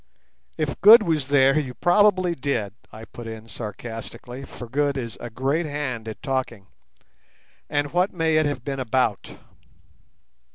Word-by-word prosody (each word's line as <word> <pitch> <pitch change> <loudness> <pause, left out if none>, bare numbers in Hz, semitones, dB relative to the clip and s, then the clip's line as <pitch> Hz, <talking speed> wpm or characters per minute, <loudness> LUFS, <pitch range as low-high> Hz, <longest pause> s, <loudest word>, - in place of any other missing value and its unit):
"If 155 -3 -3
Good 215 +4 +9
was 155 -6 0
there 140 +1 +4
you 130 -4 -5
probably 185 -1 +3
did," 125 - -2 0.2
I 110 +1 -10
put 120 0 -10
in 110 0 -8
sarcastically, 115 +4 -8
for 120 - -10
Good 140 +3 0
is 115 -4 -5
a 120 - -6
great 135 +8 -1
hand 135 -6 -4
at 110 - -8
talking. 130 -7 -3 1.0
"And 145 0 -1
what 180 +3 +2
may 160 -3 +1
it 155 -1 +3
have 135 -4 -4
been 135 -1 -3
about?" 125 -4 -1
135 Hz, 150 wpm, -24 LUFS, 120-155 Hz, 1.0 s, Good